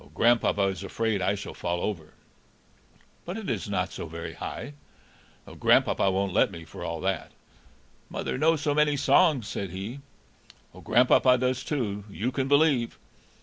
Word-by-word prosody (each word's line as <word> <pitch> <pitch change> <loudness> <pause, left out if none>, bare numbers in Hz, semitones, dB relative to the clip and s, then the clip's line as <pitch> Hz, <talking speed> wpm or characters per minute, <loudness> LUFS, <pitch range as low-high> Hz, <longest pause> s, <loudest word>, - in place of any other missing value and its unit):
"Grandpapa 115 -3 +3
is 95 -1 -1
afraid 110 0 -1
I 95 +2 +1
shall 100 - -7
fall 85 0 -2
over." 85 -6 -4 1.1
"But 175 +5 -5
it 215 - -3
is 105 -2 -3
not 90 -3 -1
so - - -6
very 80 +1 -7
high." 145 - -6 0.7
"Grandpapa 95 - +2
won't 95 0 -1
let - - +4
me, 80 -1 -10
for - - -9
all 85 -1 -4
that." 95 -3 -2 0.8
"Mother - - -3
knows 155 +3 +2
so 145 -2 +1
many 150 -1 +2
songs," 145 - +3
said 100 - -4
he. 100 +9 -6 0.7
"Grandpapa 125 +2 +4
does 130 +1 -1
too, 105 -9 -2
you 110 +5 -2
can 135 0 -1
believe." 140 -4 +3
110 Hz, 150 wpm, -27 LUFS, 95-135 Hz, 1.1 s, let